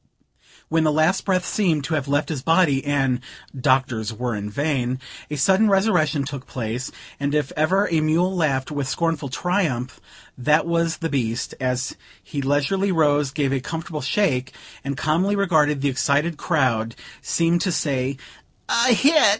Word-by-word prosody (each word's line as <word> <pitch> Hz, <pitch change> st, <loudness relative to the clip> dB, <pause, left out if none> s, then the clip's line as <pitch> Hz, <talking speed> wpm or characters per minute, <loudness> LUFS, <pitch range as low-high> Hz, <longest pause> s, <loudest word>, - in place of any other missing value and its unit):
When 160 Hz, 0 st, +1 dB
the 155 Hz, -, +3 dB
last 155 Hz, +5 st, +2 dB
breath 185 Hz, -2 st, +1 dB
seemed 170 Hz, -9 st, +1 dB
to 160 Hz, -, -3 dB
have 145 Hz, -3 st, -1 dB
left 145 Hz, +2 st, 0 dB
his 150 Hz, -5 st, -3 dB
body, 160 Hz, -3 st, +3 dB
and 135 Hz, -3 st, +1 dB, 0.4 s
"Doctors 130 Hz, -4 st, +1 dB
were 120 Hz, +1 st, -3 dB
in 105 Hz, 0 st, -4 dB
vain," 130 Hz, 0 st, -1 dB, 0.3 s
a 150 Hz, -, -3 dB
sudden 195 Hz, +8 st, +4 dB
resurrection 180 Hz, -8 st, +2 dB
took 140 Hz, -1 st, -7 dB
place; 120 Hz, +1 st, -4 dB, 0.3 s
and 140 Hz, +1 st, -1 dB
if 150 Hz, -3 st, 0 dB
ever 185 Hz, +7 st, +2 dB
a 165 Hz, -, +1 dB
mule 170 Hz, +5 st, +1 dB
laughed 140 Hz, -5 st, 0 dB
with 140 Hz, -2 st, -2 dB
scornful 165 Hz, -4 st, -1 dB
triumph, 140 Hz, -5 st, -1 dB, 0.4 s
that 150 Hz, +6 st, +2 dB
was 170 Hz, -1 st, 0 dB
the 165 Hz, -1 st, -3 dB
beast, 120 Hz, -5 st, -2 dB
as 125 Hz, 0 st, -1 dB, 0.3 s
he 140 Hz, -, -4 dB
leisurely 145 Hz, +9 st, +1 dB
rose, 150 Hz, -4 st, +2 dB
gave 140 Hz, -1 st, -1 dB
a 135 Hz, -, +1 dB
comfortable 160 Hz, +2 st, -5 dB
shake; 130 Hz, -3 st, 0 dB, 0.3 s
and, 140 Hz, 0 st, -4 dB
calmly 175 Hz, +8 st, +1 dB
regarding 155 Hz, -8 st, +2 dB
the 140 Hz, -, +2 dB
excited 145 Hz, +5 st, +1 dB
crowd 125 Hz, -9 st, 0 dB, 0.3 s
seemed 170 Hz, +1 st, +1 dB
to 185 Hz, -, 0 dB
say 135 Hz, -4 st, -1 dB, 0.5 s
"A 240 Hz, +1 st, +4 dB
hit! 300 Hz, +7 st, +4 dB
150 Hz, 160 wpm, -22 LUFS, 130-170 Hz, 0.5 s, sudden